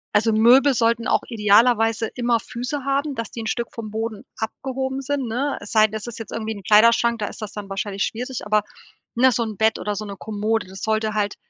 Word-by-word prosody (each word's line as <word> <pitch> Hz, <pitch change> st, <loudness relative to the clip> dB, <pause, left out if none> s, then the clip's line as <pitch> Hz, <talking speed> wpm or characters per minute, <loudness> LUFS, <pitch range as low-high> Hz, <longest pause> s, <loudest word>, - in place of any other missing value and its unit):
also 220 Hz, +2 st, +4 dB
Möbel 250 Hz, +5 st, +5 dB
sollten 230 Hz, +1 st, +1 dB
auch -, -, +2 dB
idealerweise 225 Hz, 0 st, +3 dB
immer 240 Hz, -1 st, +1 dB
Füße 255 Hz, +5 st, -5 dB
haben, 275 Hz, +1 st, 0 dB
dass 230 Hz, -3 st, -5 dB
die 230 Hz, -, -6 dB
'n 220 Hz, -, -5 dB
Stück 235 Hz, +1 st, -2 dB
vom 225 Hz, -2 st, -6 dB
Boden 220 Hz, -1 st, -4 dB
abgehoben 265 Hz, +3 st, -3 dB
sind, 275 Hz, -1 st, -2 dB
ne? 260 Hz, +6 st, -1 dB
Es -, -, -10 dB
sei 215 Hz, 0 st, +6 dB
denn, 215 Hz, -, -8 dB
es 220 Hz, +2 st, -5 dB
ist 235 Hz, -, -7 dB
jetzt 225 Hz, -, -8 dB
irgendwie 220 Hz, 0 st, -3 dB
'n 200 Hz, -2 st, -10 dB
Kleiderschrank, 230 Hz, +3 st, +5 dB
da 210 Hz, -, -1 dB
ist 225 Hz, -, -8 dB
das 210 Hz, -2 st, -5 dB
dann 205 Hz, -2 st, -7 dB
wahrscheinlich 195 Hz, 0 st, -2 dB
schwierig, 250 Hz, +1 st, -5 dB
aber 210 Hz, 0 st, +2 dB, 0.5 s
ne, 255 Hz, +2 st, +5 dB
so 240 Hz, -, 0 dB
'n 215 Hz, -3 st, -6 dB
Bett 220 Hz, 0 st, +2 dB
oder 210 Hz, 0 st, -3 dB
so 215 Hz, +1 st, -5 dB
'ne 200 Hz, -, -7 dB
Kommode, 215 Hz, +1 st, -2 dB
das 190 Hz, 0 st, -10 dB
sollte 220 Hz, 0 st, 0 dB
halt 205 Hz, -1 st, 0 dB
225 Hz, 230 wpm, -22 LUFS, 215-245 Hz, 0.5 s, sei